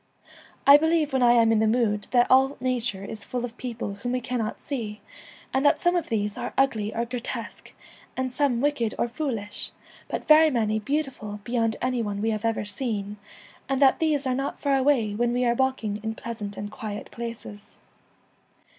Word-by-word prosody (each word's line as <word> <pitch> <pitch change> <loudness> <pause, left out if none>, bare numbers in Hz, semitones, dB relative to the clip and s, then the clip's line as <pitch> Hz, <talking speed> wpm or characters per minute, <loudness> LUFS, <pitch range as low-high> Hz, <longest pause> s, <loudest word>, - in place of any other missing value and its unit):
I 280 +1 +10
believe 320 -2 +1
when 265 - +2
I 240 -1 +6
am 230 -1 +5
in 225 - +3
the 220 - +3
mood 215 -3 +1
that 245 -1 +4
all 265 +2 +4
nature 245 -6 -2
is 215 0 -7
full 245 -1 -3
of 235 -1 -9
people 235 -5 -4
whom 245 +5 -4
we 255 - +1
cannot 245 -3 -3
see, 220 -7 -5 0.5
and 265 +1 +2
that 290 - +4
some 350 0 +2
of 345 - -1
these 210 -2 -1
are - - -5
ugly 225 -6 +1
or* 235 +1 -2
grotesque, 240 0 -6 0.5
and 260 0 -1
some 255 -3 +1
wicked 275 -6 0
or - - +1
foolish, 235 -6 -4 0.4
but - - -4
very 315 +1 +7
many 220 -5 0
beautiful 255 -5 -3
beyond 230 -1 0
any 255 -1 0
one 205 -2 -3
we 220 +2 0
1 215 -1 -1
06 - - -20
have 230 - +3
ever 220 -1 -3
seen, 205 -2 -3 0.5
and 270 -1 +1
that 275 -2 +5
these 300 -4 +1
are 260 - +1
not 275 +2 -3
far 285 - 0
Enchanted 265 +1 0
Woods, 290 -1 +6
away - - -5
when 240 +1 +1
we 250 0 +1
are 235 - +3
walking 240 -5 0
in 220 0 -3
pleasant 220 -4 -6
and 205 +1 -5
quiet 210 -1 -6
places. 230 -3 -8
240 Hz, 205 wpm, -26 LUFS, 215-265 Hz, 0.5 s, I